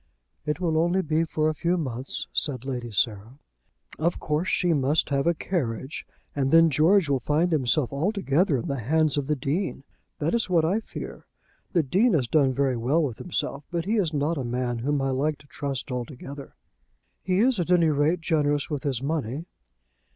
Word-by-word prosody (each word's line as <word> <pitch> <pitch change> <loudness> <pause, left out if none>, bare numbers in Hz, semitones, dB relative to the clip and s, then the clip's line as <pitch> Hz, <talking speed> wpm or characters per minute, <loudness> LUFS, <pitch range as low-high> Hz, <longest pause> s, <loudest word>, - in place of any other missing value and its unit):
"It 150 - -1
will 165 -3 +1
only 175 +3 +2
be 160 +1 +1
for 155 -1 0
a 155 - +1
few 170 +4 0
months," 130 -5 -3
said 130 -4 -1
Lady 125 -3 -4
Sarah. 110 +3 -1 0.6
"Of 170 +3 0
course 155 +4 -1
she 175 -1 +2
must 145 +1 +2
have 140 +2 +1
a 170 - +3
carriage, 135 - -3 0.3
and 135 -2 +1
then 165 +1 +6
George 165 +6 +4
will 140 -2 +1
find 155 +7 +1
himself 140 -2 +1
altogether 170 -2 +1
in 120 - -4
the 140 -3 -2
hands 155 +5 +2
of 145 -2 -1
the 150 - +1
Dean. 140 +3 -2 0.3
That 155 +2 -1
is 235 -4 0
what 165 -3 +3
I 190 +7 +2
fear. - - -8 0.5
The 170 -4 +3
Dean 195 - +3
has 130 -6 +1
done 140 -1 +3
very 130 -1 0
well 135 +8 +2
with 125 -7 -3
himself, 150 -5 -3
but 170 -1 -2
he 220 +4 +1
is 180 -7 +1
not 150 +1 0
a - - -2
man 120 0 -2
whom 145 +4 0
I 135 - 0
like 145 +3 0
to 150 - -19
trust 140 -2 -5
altogether." 135 +2 -7 0.7
"He 185 -1 0
is 240 +1 +3
at 175 - -1
any 170 -3 +4
rate 150 +4 +1
generous 145 -3 0
with 145 -3 -2
his 135 -3 -2
money." 145 0 -2
150 Hz, 195 wpm, -26 LUFS, 135-170 Hz, 0.7 s, then